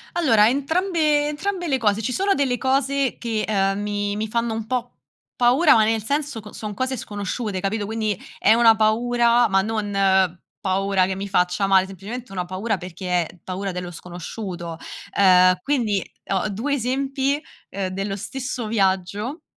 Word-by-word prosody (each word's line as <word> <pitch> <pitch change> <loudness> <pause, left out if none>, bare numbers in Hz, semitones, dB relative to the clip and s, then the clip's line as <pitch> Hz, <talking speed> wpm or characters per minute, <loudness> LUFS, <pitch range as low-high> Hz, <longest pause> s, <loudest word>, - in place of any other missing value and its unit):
Allora 230 -11 +5
entrambe 300 +1 +1
entrambe 355 +4 -3
le 270 - +2
cose, 215 -3 +1
ci 240 +4 -2
sono 390 +8 +2
delle 265 -5 0
cose 270 +1 +1
che, 225 -3 -2
ehm, 195 -1 +1
mi 205 0 -2
mi 215 +1 -2
fanno 230 +1 -1
un 220 -1 -4
po' 250 -1 -3 0.4
paura, 255 +7 +5
ma 220 - +5
nel 220 -1 0
senso 285 -1 -2
co 210 0 -12
son 210 -1 -6
cose 260 +4 -2
sconosciute, 205 -1 -4
capito? 205 +2 -1
Quindi 215 -2 -2 0.2
è 215 - +5
una 230 -1 +6
paura, 235 +2 +3
ma 195 -2 +3
non 215 0 -2 0.7
paura 195 -1 +1
che 190 +1 -2
mi 195 +1 -5
faccia 180 +1 +1
male, 190 -1 +4
semplicemente 200 +6 -8
una 180 -2 -2
paura 195 +4 -2
perché 180 0 -2
è 175 - -14
paura 190 +1 -4
dello 180 0 -5
sconosciuto. 175 0 -7 0.4
Uhm, 185 -2 +6
quindi 220 -7 0 0.3
ho 195 +2 0
2 230 +9 -2
esempi, 270 +2 0 0.3
ehm, 195 -1 -3
dello 195 +1 -3
stesso 250 +2 -4
viaggio, 205 - -1
215 Hz, 165 wpm, -22 LUFS, 195-255 Hz, 0.7 s, una